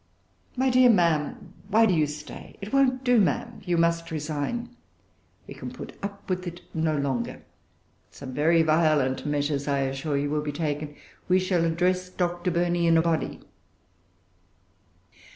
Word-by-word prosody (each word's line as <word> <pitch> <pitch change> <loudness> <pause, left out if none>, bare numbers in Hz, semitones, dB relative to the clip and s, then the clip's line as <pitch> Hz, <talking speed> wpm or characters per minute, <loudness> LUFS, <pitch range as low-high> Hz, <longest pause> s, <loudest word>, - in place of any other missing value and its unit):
"My 260 +1 +2
dear 250 0 +6
ma'am, 170 -8 +1
why 225 +2 +4
do 200 - +3
you 155 -3 +2
stay? 150 +1 -9
It 200 +4 -8
won't 265 -1 +3
do, 245 -2 +4
ma'am; 225 +4 -1
you 175 -2 0
must 170 0 +1
resign. 160 +11 -3 0.7
We - - -8
can - - -7
put - - -9
up 200 0 -7
with 185 -1 -2
it 175 0 -7
no 160 -2 0
longer. 135 -4 -2 0.7
Some 130 -2 -9
very 160 +4 +3
violent 155 -4 +2
measures, 145 -1 -1
I 140 -1 +1
assure 135 +2 -2
you, 145 +1 -1
will 150 0 0
be 150 0 -3
taken. 150 -1 -3 0.3
We 185 - +4
shall 185 -2 +1
address 180 +2 0
Dr. 175 -1 -1
Burney 175 0 +1
in 165 0 +5
a - - +5
body." 165 -2 -1
165 Hz, 155 wpm, -26 LUFS, 150-185 Hz, 0.7 s, dear